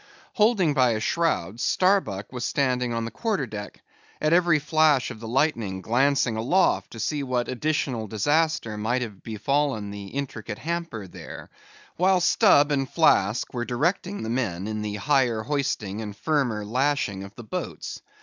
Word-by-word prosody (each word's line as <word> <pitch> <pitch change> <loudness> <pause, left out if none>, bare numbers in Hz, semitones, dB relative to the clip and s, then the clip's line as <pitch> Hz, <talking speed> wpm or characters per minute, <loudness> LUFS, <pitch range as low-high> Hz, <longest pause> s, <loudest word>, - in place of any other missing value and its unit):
Holding 210 -8 +3
by 130 -4 +3
a 110 - -1
shroud, 115 - 0
Starbuck 180 - +1
was 125 -1 -4
standing 125 -3 0
on 115 -1 -2
the 115 - -5
quarter 210 - -1
deck; 105 -3 -8 0.4
at 155 +1 +2
every 170 -2 +4
flash 150 -2 +2
of 110 - -9
the 115 - -7
lightning 115 -7 0
glancing 130 0 +2
aloft, 150 +13 +2
to 115 - -8
see 145 +6 -1
what 125 -3 -1
additional 130 -4 -1
disaster 130 0 0
might 120 +4 0
have 105 -5 -8
befallen 115 -1 -1
the 100 -1 -7
intricate 115 -4 -5
hamper 165 - -4
there; 90 - -10 0.5
while 185 +1 +4
Stubb 170 -5 +4
and 135 -2 0
Flask - - +2
were 120 - -2
directing 175 +11 -1
the 110 - -4
men 100 -8 -2
in 110 0 -3
the 105 -1 -3
higher 120 -1 +1
hoisting 110 -7 -2
and 105 -2 -7
firmer 125 -9 0
lashing 125 -4 0
of 100 +1 -11
the 120 - -9
boats. 110 - -5
125 Hz, 160 wpm, -25 LUFS, 110-150 Hz, 0.5 s, every